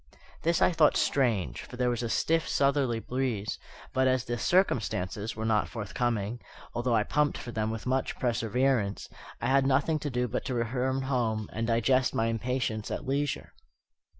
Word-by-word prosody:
This 170 0 +2
I - - +5
thought 160 -3 +4
strange, 105 - +1
for 125 - -10
there 125 0 +2
was 120 -1 -2
a 120 - -2
stiff 165 +7 +1
southerly 140 -4 +2
breeze; 120 -4 -2 0.3
but 130 0 +3
as 130 -1 +2
"the 120 - -2
circumstances" 110 - +1
were 110 +1 -3
not 110 -3 +2
forthcoming, 115 0 -2 0.3
although 120 0 +1
I 110 - +3
pumped 150 +5 +1
for 120 - -7
them 110 -1 -1
with 110 -1 -5
much 130 +1 0
perseverance, 120 -2 0 0.3
I - - -4
had 135 0 +3
nothing 140 +4 +2
to 145 - -3
do 125 -1 0
but - - -3
to 130 - -2
return 130 +3 0
home 115 -5 -1
and 115 +1 -2
digest 125 +3 +2
my 115 0 +2
impatience 115 -2 -2
at - - -4
leisure. 140 +2 -2
125 Hz, 175 wpm, -29 LUFS, 110-135 Hz, 0.3 s, I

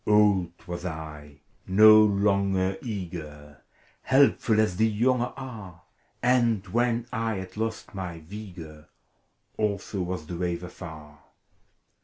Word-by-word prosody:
Old 105 -5 +4
was 85 0 -6
I, 75 -4 -8 0.3
no 110 +3 +8
longer 100 -2 +2
eager. 80 - -7 0.4
Helpful, 130 -5 +3
as 105 -5 +1
the 110 - +4
younger 120 +3 +1
are: 105 - -9 0.4
And 120 -5 +2
when 120 0 +1
I 115 -2 -1
had 95 -1 -7
lost 110 0 -4
my 90 -4 -6
vigor, 85 -4 -10 0.7
Also 100 -2 -2
was 90 -2 -4
the 85 +2 -6
wave 90 0 -2
afar. 80 -4 -10
95 Hz, 115 wpm, -26 LUFS, 85-110 Hz, 0.7 s, no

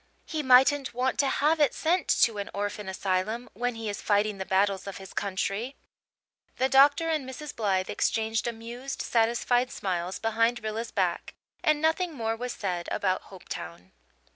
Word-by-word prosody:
He 315 -2 -3
mightn't 265 0 +4
want 255 +2 0
to 280 - +4
have 300 +4 +2
it 290 -5 +3
sent 345 +3 +1 0.2
to 220 -3 +2
an 200 - -4
orphan 205 0 -3
asylum, 195 +5 -1
when 245 +3 -2
he 225 -1 -5
is 205 -1 -4
fighting 205 -1 +1
the 190 - -4
battles 195 0 +1
of 195 - -6
his 190 -1 -11
country." 200 +5 -2 0.8
The 260 - +2
doctor 285 +5 +5
and 305 -5 -1
Mrs. 290 +2 -7
Blythe 195 -4 0
exchanged 225 +1 0
amused, 235 +3 -5
satisfied 240 +2 +2
smiles 180 -3 -3
behind 230 +1 +1
Rilla's 220 +2 -3
back; 180 -4 -1 0.3
and 305 -1 +3
nothing 325 +1 +1
more 225 -3 -1
was 245 +2 -4
said 180 -4 -3
about 185 -2 0
Hopetown. 90 - -9
225 Hz, 165 wpm, -28 LUFS, 200-260 Hz, 0.8 s, doctor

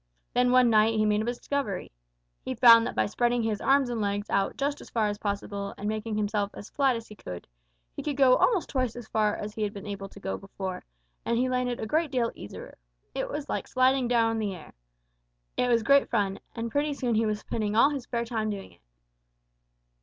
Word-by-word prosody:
Then 250 0 +3
one 250 -2 +5
night 220 +1 +4
he 215 0 +2
made 210 0 +2
a - - -2
discovery. 240 -4 -3 0.5
He 260 - -3
found 230 -1 +8
that - - -5
by - - +2
spreading 240 +2 +1
his 215 -2 -1
arms 275 -1 +3
and 235 -2 -2
legs 205 0 -2
out 195 0 +1
just 285 +1 -1
as - - -12
far 225 -2 +1
as 205 0 -4
possible 200 -1 -4
and 205 - -4
making 215 0 -2
himself 205 -1 0
as 205 - -10
flat 270 -3 +2
as 230 0 -6
he - - -11
could, 90 - -8 0.5
he - - -4
could 290 -2 -3
go 260 -2 +6
almost 415 -8 +2
twice 255 -4 -1
as 240 -2 -8
far 215 -2 +1
as 210 0 -6
he 220 - -6
had 210 -1 -1
been 200 -1 -8
able 200 -1 -6
to 200 - -13
go 195 - -4
before, 190 -1 -6 0.4
and 235 - 0
he 255 +2 +2
landed 250 -1 -1
a - - -3
great 310 +7 +1
deal 245 -4 0
easier. 100 - -10 0.3
It 265 - -3
was 295 -1 -4
like - - -3
sliding 255 0 +3
down 230 -2 +3
on 225 - -2
the 205 -3 -2
air. 165 - -13 0.8
It 250 - +1
was 235 -2 +3
great 280 +3 +4
fun, 200 -4 0 0.2
and 230 0 -4
pretty 290 +2 0
soon 245 -4 -1
he 220 0 +2
was 210 0 0
spending 215 -2 -2
all 275 +6 +6
his 275 -4 -4
spare 235 -1 -2
time 220 -2 -2
doing 200 -2 -6
it. - - -24
225 Hz, 230 wpm, -27 LUFS, 210-255 Hz, 0.8 s, found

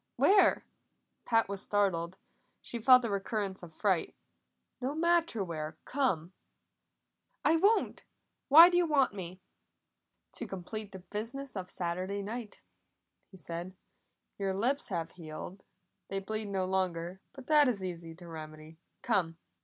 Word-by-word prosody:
"Where?" 400 0 +4 0.6
Pat 225 -1 +3
was 200 0 -4
startled; 190 -3 0 0.4
she 235 - -5
felt 250 +1 +7
a - - -1
recurrence 200 -1 -2
of 175 -2 -10
fright. 185 +1 0 0.7
"No 265 +4 -2
matter 335 - +2
where. 155 -3 -5
Come." 190 - 0 1.1
"I 325 - +5
won't! 415 +6 +2 0.4
Why 320 +5 +11
do 350 0 +2
you 350 -1 +3
want 275 -7 +3
me?" 185 -1 -7 0.9
"To 235 - -2
complete 200 +2 -6
the 190 - -8 0.2
business 245 +5 -4
of 185 -2 -5
Saturday 185 +3 -2
night," 220 +1 -6 0.7
he 190 - -14
said. 175 +1 -6 0.6
"Your 195 -1 -1
lips 250 +8 0
have 165 -4 -3
healed; 170 +3 -8 0.5
they 195 - -3
bleed 215 +3 -3
no 190 -2 -1
longer, 185 -1 -2
but 270 -2 -11
that 300 -1 +5
is 210 -6 -1
easy 170 -3 -6
to 175 0 -12
remedy. 155 0 -10 0.2
Come." 180 -8 +1
195 Hz, 140 wpm, -31 LUFS, 175-245 Hz, 1.1 s, Why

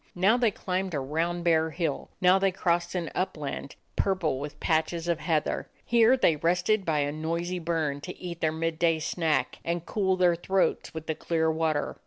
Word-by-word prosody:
Now 190 +5 +4
they 240 -2 +3
climbed 185 -3 -3
a - - 0
round 165 +6 -1
bare 160 -1 +3
hill; 160 -3 -3
now 185 +1 +5
they 195 0 +2
crossed 175 -1 0
an 170 -3 -2
upland, 150 -6 -3 0.2
purple 175 -9 0
with 145 +1 -7
patches 160 +1 0
of 170 -2 +1
heather. 155 -1 -1 0.2
Here 235 +2 +5
they 165 -11 +3
rested 180 +6 +1
by 155 -3 +1
a 145 0 0
noisy 170 +4 -2
burn 160 -4 -1
to 180 +4 -7
eat 175 -2 -7
their 155 - +2
midday 165 +1 +1
snack 155 -4 -1
and 170 0 -2
cool 190 0 +1
their 180 -2 +4
throats 190 +2 0
with 160 0 -5
the 160 - -1
clear 160 0 0
water. 160 -2 -1
170 Hz, 185 wpm, -27 LUFS, 160-180 Hz, 0.2 s, now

